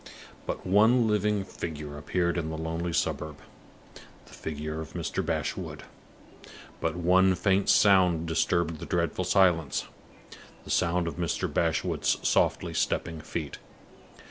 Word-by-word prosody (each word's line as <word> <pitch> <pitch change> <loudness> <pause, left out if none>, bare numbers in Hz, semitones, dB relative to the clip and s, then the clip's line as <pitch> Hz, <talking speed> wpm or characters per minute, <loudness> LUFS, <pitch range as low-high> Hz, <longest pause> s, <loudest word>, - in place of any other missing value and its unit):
But - - -4
one 110 +5 +4
living 105 -1 +1
figure 75 -5 -6
appeared 85 +3 -1
in 80 -3 -2
the 80 - -4
lonely 80 +2 -3
suburb 75 -2 -2 0.9
the - - -17
figure 75 0 -5
of 80 - -9
Mr. 85 -3 -2
Bashwood. - - -3 1.0
But 80 0 -1
one 90 +2 +4
faint 95 +2 +1
sound 90 -5 +5
disturbed 80 0 0
the - - -7
dreadful 85 +1 -1
silence 85 -8 +2 0.8
the - - -7
sound 85 -1 +1
of 80 - -5
Mr. 85 -3 -1
Bashwood's 80 -2 +1
softly - - +1
stepping 80 -2 -1
feet. 80 -2 -5
85 Hz, 125 wpm, -28 LUFS, 80-95 Hz, 1.0 s, sound